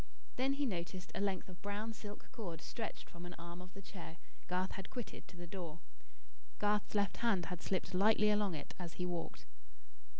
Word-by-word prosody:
Then 265 +2 +4
he 285 +1 +2
noticed 180 -4 -1
a - - 0
length 195 -3 +2
of 185 -1 -10
brown 205 +2 -1
silk 210 -1 -7
cord 175 -8 -3
stretched 225 +5 -3
from 170 0 -8
an 175 0 -5
arm 170 +1 -6
of 185 +1 -10
the 195 - -7
chair 170 -3 -7 0.3
Garth 185 +1 +2
had 195 - -4
quitted 245 -4 -4
to 180 - -12
the 175 - -5
door. 170 -2 -4 0.8
Garth's 210 0 +3
left 200 -2 +4
hand 205 -7 +4
had 180 -1 -3
slipped 190 -1 +1
lightly 210 +2 +7
along 205 -4 +4
it 145 - -5
as 170 -2 -3
he 180 - 0
walked. 175 -2 -2
190 Hz, 195 wpm, -39 LUFS, 175-210 Hz, 0.8 s, lightly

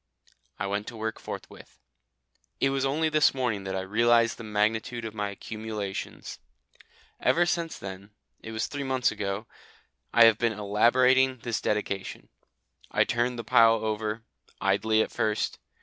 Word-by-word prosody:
I - - -3
went 100 +1 -2
to 115 - -7
work 110 +1 -3
forthwith. - - -9 0.8
It 135 - +2
was 135 0 0
only 150 +4 +1
this 155 -2 +3
morning 115 -7 -1
that 95 0 -3
I 95 - -1
realised 115 +4 +3
the - - -7
magnitude 110 +3 -1
of 110 - -5
my 105 -2 -2
accumulations. 105 -1 -6 0.8
Ever 175 +1 +3
since 170 -1 -1
then 95 +1 -8 0.3
it 110 - -9
was 110 0 -1
three 145 - -5
months 130 -2 +1
ago 100 +2 -3 0.7
I 115 - +7
have 115 -1 +5
been 115 -1 +1
elaborating 125 +6 +3
this 120 -2 -2
Dedication. 100 -3 -3 0.6
I - - +3
turned 120 +1 0
the 115 - -4
pile 115 +1 +5
over, 110 0 -3 0.4
idly 110 +3 +2
at - - -7
first. 105 -1 -1
110 Hz, 150 wpm, -27 LUFS, 105-125 Hz, 0.8 s, I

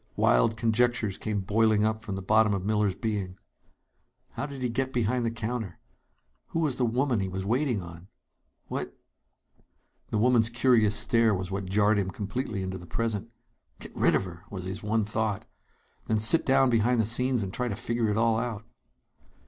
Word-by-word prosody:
Wild - - +3
conjectures 115 -2 +1
came 105 -2 -2
boiling 110 +2 +2
up 110 0 -1
from 105 -3 -5
the 95 - -6
bottom 110 +1 +3
of 95 -1 -4
Miller's 105 -2 +1
being. 100 -5 -3 0.9
How 145 - -4
did 140 -3 -7
he - - +1
get 130 +2 -2
behind 125 0 0
the 115 - +1
counter? 115 -4 -4 0.7
Who 165 - -3
was 145 -6 0
the 125 - +1
woman 125 0 0
he 95 -1 -2
was 95 +1 -4
waiting 120 -2 0
on? 85 +1 -11 0.6
What - - -5 1.1
The - - -1
woman's 115 0 +3
curious 115 -3 +3
stare 115 -1 +3
was 95 0 -4
what 100 0 -3
jarred 105 +1 +3
him 95 -2 -1
completely 105 +2 -4
into 95 0 -5
the 90 - -12
present. 115 0 -3 0.5
Get - - -10
rid - - +3
of - - 0
her! 85 -1 -10
was 95 -3 -6
his 95 +2 -5
one 110 0 0
thought. 105 -1 -2 0.6
Then 110 - +1
sit 110 +10 +5
down 135 -1 +4
behind 115 +1 +2
the 110 - +2
scenes 125 +1 +1
and 95 -1 -6
try 125 - -2
to 105 - -3
figure 115 0 -1
it 105 - 0
all 115 0 +2
out. 115 -3 -4
110 Hz, 185 wpm, -27 LUFS, 100-120 Hz, 1.1 s, sit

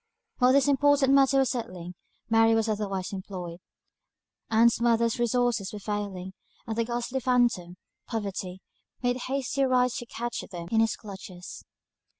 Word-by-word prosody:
While 250 0 +5
this 280 0 +4
important 285 -1 +4
matter 275 0 +5
was 270 -1 +3
settling, 180 -8 -5 0.3
Mary 225 0 +4
was 225 0 +1
otherwise 200 -3 -2
employed. 180 -3 -6 0.9
Ann's 230 +1 +4
mother's 235 0 +2
resources 240 -4 +1
were 210 - -6
failing; 200 -3 -4 0.3
and 220 - -3
the 230 0 0
ghastly 240 +2 -2
phantom, 240 -9 +1 0.3
poverty, 195 -4 -4 0.4
made 245 0 +1
hasty 275 +1 -1
strides 250 -1 +2
to 240 - -6
catch 240 +1 -4
them 170 -3 -7
in 225 - +3
his 225 0 +2
clutches. 190 -3 -10
225 Hz, 145 wpm, -27 LUFS, 195-250 Hz, 0.9 s, While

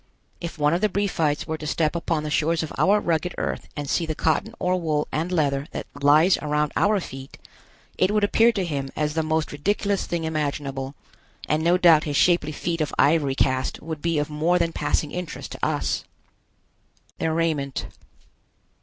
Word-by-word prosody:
If 170 0 -6
one 150 +1 +2
of 175 - 0
the 215 - +3
Briefites 175 -7 0
were 160 -1 -4
to 150 - -6
step 155 +1 0
upon 165 -2 -1
the 150 - -4
shores 160 +1 +1
of 155 - -6
our 205 +2 +4
rugged 170 -1 -1
Earth - - -3
and 145 -1 -3
see 165 +3 0
the 155 - -2
cotton 190 +10 0
or 180 0 0
wool 155 -2 0
and 165 +4 -2
leather 145 -4 0
that - - -4 0.2
lies 155 +6 +5
around 150 0 0
our 205 0 +3
feet, 135 -5 -9 0.6
it 185 - +4
would 210 0 +1
appear 225 +3 +4
to 195 -4 -1
him 140 -5 -3
as 150 -1 -1
the 160 - +1
most 155 0 -1
ridiculous 200 +6 -1
thing 170 -1 -2
imaginable, 140 -3 -3 0.5
and 155 +1 +1
no 175 +2 +4
doubt 170 -4 +6
his 145 -2 -1
shapely 170 -4 +3
feet 165 +2 -3
of 150 - -2
ivory 145 -2 +3
cast 130 -1 0
would 160 -1 -6
be 170 -1 0
of 145 0 0
more 155 +4 +1
than 170 -1 0
passing 145 0 -1
interest 180 -4 -6
to - - -9
us. - - 0 1.2
THEIR 160 0 0
RAIMENT. 155 -5 -1
160 Hz, 190 wpm, -24 LUFS, 150-175 Hz, 1.2 s, doubt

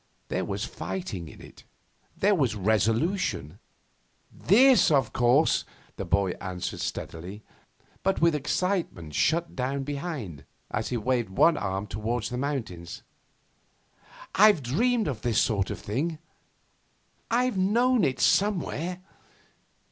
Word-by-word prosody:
There - - -1
was - - -3
fighting 105 - -5
in 75 - -13
it. - - -14 0.5
There 205 +2 +3
was 130 - +1
resolution. 110 - 0 0.7
'This, 255 +7 +5
of 140 -4 +2
course,' 125 +5 +3 0.3
the - - -5
boy 100 -2 +1
answered 90 -1 -4
steadily, 90 +6 -6 0.6
but 195 0 0
with 170 0 +4
excitement 150 - -2
shut 170 - +1
down 135 +2 -2
behind, 140 - -5 0.3
as 105 +1 -2
he 125 - -1
waved 120 -1 0
one 160 - +4
arm 95 -2 -2
towards 110 +3 -3
the 125 - -3
mountains. 110 -12 -4 1.3
'I've 205 -6 +5
dreamed 225 - +1
this 120 - 0
sort 100 -4 +1
of - - -4
thing; 150 +10 -2 1.1
I've 240 -3 +1
known 235 +4 +3
it 135 -4 0
somewhere. 180 -3 +1
135 Hz, 115 wpm, -27 LUFS, -, 1.3 s, This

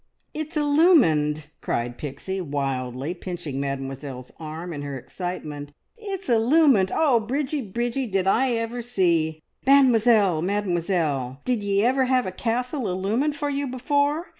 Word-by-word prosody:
"It's 310 +1 -4
illumined!" 250 - +3
cried 120 +1 -2
Pixie 155 +7 -4
wildly, 135 -1 -3
pinching 175 -6 -6
Mademoiselle's 135 -1 -5
arm 160 +2 -6
in 145 - -5
her 140 -1 -5
excitement. 150 -2 -6 0.2
"It's 395 -4 -6
illumined! 240 - +4
Oh, 275 -7 +3
Bridgie, 275 +6 -2
Bridgie, 240 +4 -2
did 195 -3 0
I 245 +6 +3
ever 230 +1 -2
see! 170 -9 0 0.2
Mademoiselle, 230 - +5
Mademoiselle, 170 -8 -1
did 245 -4 0
ye 200 0 +1
ever 260 +1 +3
have 255 -1 +2
a 185 - -3
castle 245 - -2
illumined 215 +11 0
for 290 0 -2
you 280 0 -2
before? 285 +5 0
200 Hz, 135 wpm, -24 LUFS, -, 0.2 s, Mademoiselle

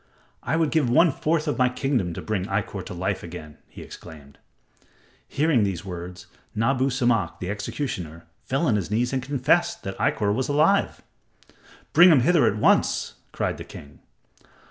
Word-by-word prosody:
"I 140 - -1
would 160 -2 +1
give 150 -6 +2
one 165 +7 +5
fourth 155 +3 -1
of 150 - -2
my 125 0 +4
kingdom 125 -8 -1
to - - -6
bring 105 -4 -2
Ikkor - - -3
to - - -7
life - - -2
again," 80 -3 -10
he - - -11
exclaimed. 70 -3 -13 0.9
Hearing 145 -6 +2
these 95 -3 -3
words, 90 0 -8 0.3
Nabu 130 +4 +1
Samak, 120 -5 0
the 90 +2 -4
executioner, 90 - -5 0.2
fell 135 +5 -1
on 115 -8 +2
his 95 -4 -4
knees 120 +5 0
and 130 - 0
confessed 140 +6 0
that 95 0 -5
Ikkor 105 -1 +1
was 130 +5 -2
alive. 155 +8 +2 0.9
"Bring 175 +2 +8
him 145 -6 +5
hither 155 0 +4
at 105 - 0
once," - - +2 0.2
cried - - -2
the - - -6
king. 70 -1 -13
120 Hz, 165 wpm, -24 LUFS, 95-145 Hz, 0.9 s, Bring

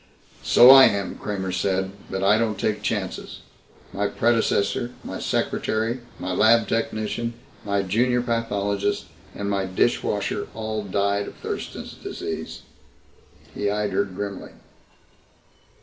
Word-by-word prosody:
"So 125 +2 +8
I 135 0 +10
am," 100 -1 0
Kramer 95 -3 -4
said, 95 +1 0 0.2
"but 95 0 -3
I 105 +3 +4
don't 110 -3 0
take 105 -1 -1
chances. 100 -4 -3 0.5
My - - 0
predecessor, 120 +1 +1
my - - -6
secretary, 115 +3 -1 0.2
my 90 - -4
lab 110 +4 +4
technician, 115 +1 -2 0.3
my 100 -1 0
junior 120 +6 +1
pathologist, 105 -4 -1 0.3
and 100 - -4
my 100 -1 0
dishwasher 95 0 0
all 110 -1 -3
died 100 +1 0
of - - -9
Thurston's - - -6
Disease." - - -6 0.9
He 105 - -1
eyed 105 0 -1
her 100 +2 +1
grimly. 100 +1 -6
105 Hz, 120 wpm, -24 LUFS, 100-115 Hz, 0.9 s, I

